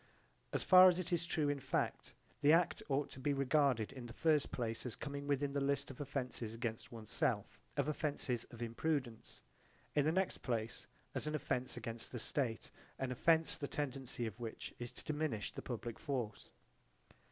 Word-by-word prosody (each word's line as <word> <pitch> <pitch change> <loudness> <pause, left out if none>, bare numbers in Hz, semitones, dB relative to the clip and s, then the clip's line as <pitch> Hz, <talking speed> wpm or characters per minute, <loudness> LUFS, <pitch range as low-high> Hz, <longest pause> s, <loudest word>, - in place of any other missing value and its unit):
As - - +1
far 185 0 +10
as 175 - +2
it 180 0 -2
is 170 -1 +1
true 155 -4 +1
in 145 0 +1
fact, 135 0 -1 0.3
the 145 0 +6
act 170 0 +4
ought 140 +1 +1
to - - -9
be 145 +2 +1
regarded 135 -4 +3
in 130 -3 -7
the 115 - -9
first 155 +1 +3
place 115 -2 -2
as 125 -4 -3
coming 140 -1 -5
within 140 0 +1
the 140 0 0
list 140 0 0
of 135 - -8
offences 125 -5 -3
against 115 -1 -3
one's 110 -2 -9
self, - - 0 0.2
of - - +2
offences 145 -5 -1
of 120 -1 -7
imprudence: 120 0 -2 0.5
in 145 - +4
the 155 - +3
next 190 +2 +1
place, 115 -3 -2 0.3
as - - -1
an 150 - 0
offence 130 -4 -1
against 115 -1 -4
the 125 - -4
state, 115 -2 0 0.3
an 130 -1 -2
offence 160 +5 +3
the 145 - -2
tendency 135 -4 -2
of 110 +1 -5
which 115 -2 -5
is 120 -1 -4
to - - -11
diminish 150 -9 -1
the - - -6
public 120 -2 -5
force. 125 -9 -3
135 Hz, 185 wpm, -37 LUFS, 120-150 Hz, 0.5 s, far